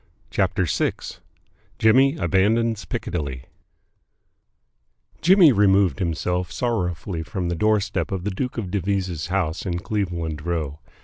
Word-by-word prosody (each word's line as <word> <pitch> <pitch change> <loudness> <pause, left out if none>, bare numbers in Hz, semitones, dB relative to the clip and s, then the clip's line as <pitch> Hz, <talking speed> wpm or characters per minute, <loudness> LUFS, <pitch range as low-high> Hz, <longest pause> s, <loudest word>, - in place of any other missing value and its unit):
CHAPTER - - +1
VI - - 0 0.8
JIMMY 135 +6 +4
ABANDONS 110 - +1
PICCADILLY 70 -7 -4 1.8
Jimmy 180 -3 +7
removed 100 -3 +3
himself 90 0 -1
sorrowfully 90 -7 -2
from 90 -1 -3
the 85 - -1
doorstep 105 +3 0
of 95 -2 -3
the 105 - -2
Duke 125 +7 -4
of 100 -6 -4
Devizes' 95 -4 -1
house 90 -3 -1
in 90 -2 -2
Cleveland 85 -6 -3
Row. 80 -4 -3
95 Hz, 115 wpm, -23 LUFS, 85-110 Hz, 1.8 s, Jimmy